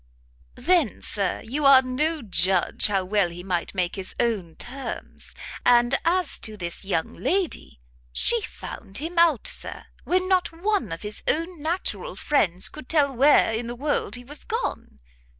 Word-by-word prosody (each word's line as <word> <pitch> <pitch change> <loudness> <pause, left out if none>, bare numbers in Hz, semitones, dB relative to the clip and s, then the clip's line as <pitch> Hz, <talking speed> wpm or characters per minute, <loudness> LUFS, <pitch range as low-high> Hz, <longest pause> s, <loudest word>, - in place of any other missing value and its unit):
"Then, 340 - +1
Sir, 200 -3 -2
you 285 +6 -2
are 275 -1 +8
no 295 +4 -1
judge 185 -3 +1
how 195 -3 0
well 195 -2 +2
he 175 +1 -9
might 180 0 -2
make 180 -2 0
his 190 -2 -6
own 205 -9 0
terms. 265 +2 -7 0.3
And 240 +1 +5
as 360 +2 +1
to 215 -1 -5
this 170 -3 -5
young 190 -4 -1
lady, 370 - -1 0.3
she 470 - +2
found 200 - -7
him 335 +4 -2
out, 325 -8 +4
Sir, - - -3 0.2
when 370 +1 +1
not 370 -2 +2
one 390 - -1
of 165 - -5
his 210 0 -4
own 330 +1 0
natural 360 +9 -2
friends 185 - +1
could 305 -4 -11
tell 290 -3 +3
where 265 -2 +5
in 230 +1 -2
the 240 - -5
world 290 +2 -1
he 245 - -9
was 290 +4 -10
gone! 445 - -4
255 Hz, 165 wpm, -25 LUFS, 195-330 Hz, 0.3 s, are